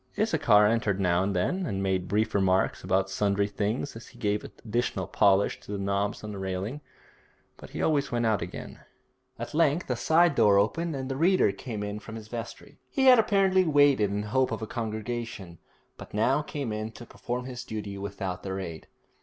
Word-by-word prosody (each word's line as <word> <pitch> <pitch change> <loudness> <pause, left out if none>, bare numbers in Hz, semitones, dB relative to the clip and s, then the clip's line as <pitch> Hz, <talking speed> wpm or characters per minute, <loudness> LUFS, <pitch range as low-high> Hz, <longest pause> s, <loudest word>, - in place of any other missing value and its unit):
Issachar 105 0 +4
entered 105 -3 +1
now 90 -2 +2
and 100 0 -1
then, 180 - 0
and 95 0 -2
made 95 -1 0
brief 110 +2 0
remarks 95 -1 +1
about 95 +1 +1
sundry 100 0 +1
things 105 +6 -2
as 115 - -10
he - - -17
gave 105 0 -1
additional 110 -4 -3
polish 100 +2 +2
to - - -11
the 100 - -2
knobs 100 +1 -1
on 105 - -5
the 100 - -6
railing, 95 +9 -4 0.7
but - - -12
he - - -4
always 145 -3 +1
went 120 -1 0
out 110 -3 +2
again. - - -7 0.6
At - - -6
length 160 +1 +2
a - - +1
side 165 +5 +3
door 105 -7 +5
opened 160 +11 +1
and 130 -1 -4
the 135 - -3
reader 170 - +3
came 105 +1 -6
in 105 +1 -4
from 110 +1 -9
his 110 -1 -9
vestry. 120 0 -8
He 270 - 0
had 255 -2 +8
apparently 195 -3 +3
waited 145 - +4
in 100 +1 -2
hope 130 +5 +1
of 110 0 -3
a - - -1
congregation, 110 -5 -5 0.4
but - - -10
now 130 +7 +2
came 140 -6 -4
in 110 +1 -4
to 120 - -10
perform 125 +1 -5
his 125 -1 -6
duty 105 -3 -6
without 95 -2 -4
their 95 0 -4
aid. 85 -4 -7
110 Hz, 195 wpm, -27 LUFS, 100-130 Hz, 0.7 s, had